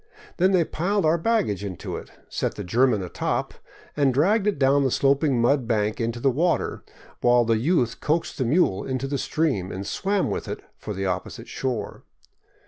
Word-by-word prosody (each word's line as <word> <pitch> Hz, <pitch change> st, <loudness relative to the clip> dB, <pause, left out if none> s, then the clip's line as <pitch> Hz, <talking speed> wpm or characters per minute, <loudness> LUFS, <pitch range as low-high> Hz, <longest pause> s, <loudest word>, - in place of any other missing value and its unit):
Then 185 Hz, +2 st, +4 dB
they 180 Hz, -3 st, +4 dB
piled 195 Hz, +5 st, 0 dB
our 160 Hz, +2 st, +3 dB
baggage 185 Hz, -, 0 dB
into 95 Hz, -3 st, -5 dB
it, -, -, -8 dB, 0.2 s
set -, -, -2 dB
the -, -, -5 dB
German 115 Hz, +2 st, +2 dB
atop, 90 Hz, -, -2 dB, 0.4 s
and 140 Hz, -2 st, +3 dB
dragged 195 Hz, -, +2 dB
it 210 Hz, -, +1 dB
down 140 Hz, +1 st, +3 dB
the 135 Hz, -, +2 dB
sloping 140 Hz, 0 st, +2 dB
mud 120 Hz, +1 st, +2 dB
bank 110 Hz, -1 st, 0 dB
into 115 Hz, +1 st, -2 dB
the 135 Hz, +2 st, +2 dB
water, 165 Hz, +6 st, 0 dB, 0.4 s
while 120 Hz, -1 st, +4 dB
the 115 Hz, -1 st, +2 dB
youth 125 Hz, -3 st, +1 dB
coaxed 160 Hz, +1 st, -1 dB
the -, -, +2 dB
mule 120 Hz, -, +2 dB
into 130 Hz, 0 st, -3 dB
the 135 Hz, 0 st, -2 dB
stream 130 Hz, -, -1 dB
and 95 Hz, +2 st, -5 dB
swam 195 Hz, -, 0 dB
with -, -, -3 dB
it -, -, -5 dB
for 105 Hz, -, -6 dB
the 95 Hz, +1 st, -2 dB
opposite 90 Hz, -1 st, -4 dB
shore. 120 Hz, -6 st, -4 dB
135 Hz, 185 wpm, -24 LUFS, 115-165 Hz, 0.4 s, Then